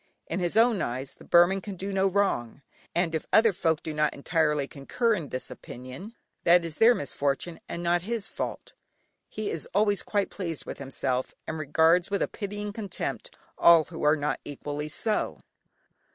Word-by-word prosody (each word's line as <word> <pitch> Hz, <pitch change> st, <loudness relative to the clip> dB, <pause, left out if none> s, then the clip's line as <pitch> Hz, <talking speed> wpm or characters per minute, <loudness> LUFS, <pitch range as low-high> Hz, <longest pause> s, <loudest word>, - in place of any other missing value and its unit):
In 170 Hz, -, -3 dB
his 175 Hz, +2 st, -1 dB
own 230 Hz, -2 st, +4 dB
eyes 130 Hz, +3 st, -3 dB
the -, -, -16 dB
Burman 175 Hz, +3 st, +5 dB
can 200 Hz, 0 st, -6 dB
do 195 Hz, +2 st, -4 dB
no 195 Hz, 0 st, +3 dB
wrong, 180 Hz, -, 0 dB, 0.3 s
and 170 Hz, -1 st, +1 dB
if 160 Hz, -, -2 dB
other 220 Hz, -1 st, +5 dB
folk 160 Hz, -4 st, 0 dB
do 155 Hz, -, -4 dB
not 150 Hz, 0 st, +1 dB
entirely 150 Hz, -1 st, +1 dB
concur 225 Hz, -, 0 dB
in 165 Hz, -9 st, -3 dB
this 130 Hz, -, -4 dB
opinion, 130 Hz, -, -9 dB, 0.3 s
that 175 Hz, 0 st, +5 dB
is 160 Hz, -2 st, -5 dB
their 235 Hz, +2 st, +6 dB
misfortune 145 Hz, +2 st, -2 dB
and 170 Hz, -, -4 dB
not 175 Hz, 0 st, +2 dB
his 220 Hz, +2 st, -3 dB
fault. -, -, -5 dB, 0.6 s
He 215 Hz, -1 st, -3 dB
is 165 Hz, -, -5 dB
always 205 Hz, -1 st, +3 dB
quite 205 Hz, -2 st, -1 dB
pleased 170 Hz, -6 st, -4 dB
with -, -, -7 dB
himself, 130 Hz, -1 st, -2 dB
and 160 Hz, -, -4 dB
regards 160 Hz, +4 st, +3 dB
with 200 Hz, -1 st, +1 dB
a -, -, 0 dB
pitying 205 Hz, 0 st, -5 dB
contempt 220 Hz, -, -4 dB, 0.2 s
all 170 Hz, -2 st, +7 dB
who 165 Hz, +1 st, -9 dB
are 150 Hz, +1 st, +5 dB
not 150 Hz, -1 st, -1 dB
equally 145 Hz, +1 st, -5 dB
so. 215 Hz, +7 st, -1 dB
170 Hz, 180 wpm, -27 LUFS, 150-200 Hz, 0.6 s, all